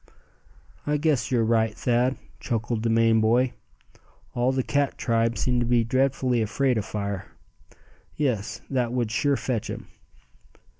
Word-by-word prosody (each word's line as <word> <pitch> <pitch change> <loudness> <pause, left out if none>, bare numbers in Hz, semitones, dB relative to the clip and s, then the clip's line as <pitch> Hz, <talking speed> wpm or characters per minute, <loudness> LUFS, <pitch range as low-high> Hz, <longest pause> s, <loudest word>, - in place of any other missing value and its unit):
"I 150 0 +2
guess 145 -7 +1
you're 120 -3 +2
right, 110 -1 +2
Thad," 125 +2 +1 0.2
chuckled 115 -2 -2
the 115 - 0
Maine 115 0 +4
boy. 120 +3 +3 0.8
"All 120 +2 +1
the 130 -1 0
cat 140 +1 0
tribe 115 -1 +1
seem 125 +4 +1
to 120 - +1
be 120 -1 +3
dreadfully 130 0 +1
afraid 120 +3 +1
of 105 - -4
fire. 100 -2 -4 0.9
Yes, 125 -9 -1
that 125 -3 0
would 120 -3 -1
sure 140 +4 +1
fetch 120 -5 -2
him." - - -7
120 Hz, 145 wpm, -25 LUFS, 115-130 Hz, 0.9 s, Maine